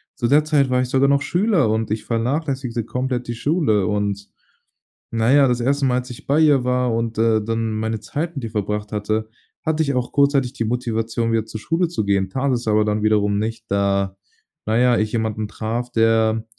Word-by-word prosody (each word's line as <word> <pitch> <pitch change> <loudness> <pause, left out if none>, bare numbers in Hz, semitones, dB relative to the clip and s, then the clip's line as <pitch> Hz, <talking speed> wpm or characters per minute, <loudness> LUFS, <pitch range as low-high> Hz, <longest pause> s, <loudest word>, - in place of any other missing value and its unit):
zu 120 - -1
der 145 +4 +4
Zeit 145 -4 +2
war 125 0 +2
ich 125 - -2
sogar 135 +1 +3
noch 140 0 +3
Schüler 180 - +1
und 110 0 -1
ich 110 - -2
vernachlässigte 125 0 -2
komplett 125 0 -3
die 120 - -3
Schule 120 - +1
und, 100 -1 -2 0.8
na 115 +1 +1
ja, 140 -1 +6
das 125 -1 0
1. 140 +3 +1
Mal, 125 -1 +2
als 125 +1 -8
ich 120 - -10
bei 145 +3 +3
ihr 145 -5 +4
war 125 -1 +1
und, 115 -1 -2
äh, 110 -1 +3
dann 115 0 -2
meine 110 0 -2
Zeit 165 +8 -4
mit 135 - -5
ihr 115 - -5
verbracht 105 -1 -3
hatte, 110 +1 -2 0.4
hatte 160 0 +1
ich 140 -2 -1
auch 125 -1 -2
kurzzeitig 140 -3 +2
die 115 - -2
Motivation 115 -1 -1
wieder 110 -1 0
zur 110 - -7
Schule 165 +9 0
zu 165 -10 -2
gehen, 100 -1 +1
tat 135 +1 -1
es 120 -2 -2
aber 105 0 +3
dann 105 0 -1
wiederum 105 -1 +2
nicht, 110 +1 -4
da, 100 -1 0 0.5
na 110 +1 +1
ja, 125 -1 +4
ich 110 0 0
jemanden 110 -2 -2
traf, 115 +3 -4
der 115 -1 +2
115 Hz, 210 wpm, -21 LUFS, 110-135 Hz, 0.8 s, ja